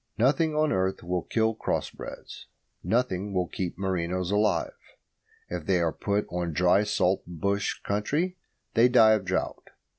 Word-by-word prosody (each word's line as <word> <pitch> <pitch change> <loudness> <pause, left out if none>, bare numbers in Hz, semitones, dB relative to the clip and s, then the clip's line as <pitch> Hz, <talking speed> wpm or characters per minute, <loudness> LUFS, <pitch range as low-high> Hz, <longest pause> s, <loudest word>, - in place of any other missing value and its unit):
Nothing 145 +6 +2
on 155 0 +2
earth 95 0 0
will 90 0 -1
kill 110 +3 0
cross 110 - -2
breds; - - -10 0.4
nothing 105 -5 0
will 90 -1 +2
keep 90 -1 -4
merinos 90 -1 -1
alive. 105 +1 +1 0.7
If 85 -3 -6
they 95 -2 +3
are 85 -2 +1
put 105 0 -1
on 85 -2 -2
dry 90 +4 +4
salt 95 -2 +1
bush 100 +4 -2
country 150 - -1 0.4
they 120 +2 +5
die 115 -3 +6
of 105 -3 0
drought. 95 +1 -2
100 Hz, 150 wpm, -27 LUFS, 90-110 Hz, 0.7 s, die